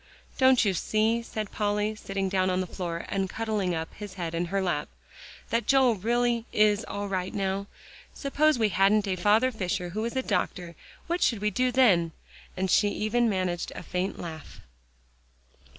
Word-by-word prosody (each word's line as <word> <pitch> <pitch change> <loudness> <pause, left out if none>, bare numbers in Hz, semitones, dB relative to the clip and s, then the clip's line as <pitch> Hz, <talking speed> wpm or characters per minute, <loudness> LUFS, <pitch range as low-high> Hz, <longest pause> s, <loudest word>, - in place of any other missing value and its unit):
"Don't 260 -3 +5
you 195 - +2
see," 220 +5 +1
said 215 -3 -5
Polly, 210 0 0
sitting 195 -2 -3
down 185 -1 +1
on 185 0 +1
the 185 - -1
floor 170 -2 -5
and 195 -1 -1
cuddling 210 -5 -1
up 160 0 -5
his 205 -2 -9
head 170 -3 -4
in 170 +1 -1
her 195 +3 -1
lap, 175 -6 -1 0.6
"that 230 +1 0
Joel 265 -4 +4
is - - -18
really 240 0 +1 0.4
all 205 0 -4
right 185 -1 -2
now? 195 0 -1 0.4
Suppose 300 +1 +1
we 220 -2 +2
hadn't 200 +2 +3
a 190 - 0
Father 215 +7 +3
Fisher 185 -4 -2
who 210 +5 -3
was 230 +2 -3
a 260 - 0
doctor, 175 -8 -2 0.3
what 345 +1 -2
should 230 - +3
we 210 +1 -1
do 255 +2 +1
then?" 190 -11 +4 0.4
and 190 0 0
she 205 - +4
even 215 +3 +1
managed 185 -3 -1
a - - -7
faint 185 +2 -3
laugh. 160 -3 -8
200 Hz, 180 wpm, -27 LUFS, 185-230 Hz, 0.6 s, Don't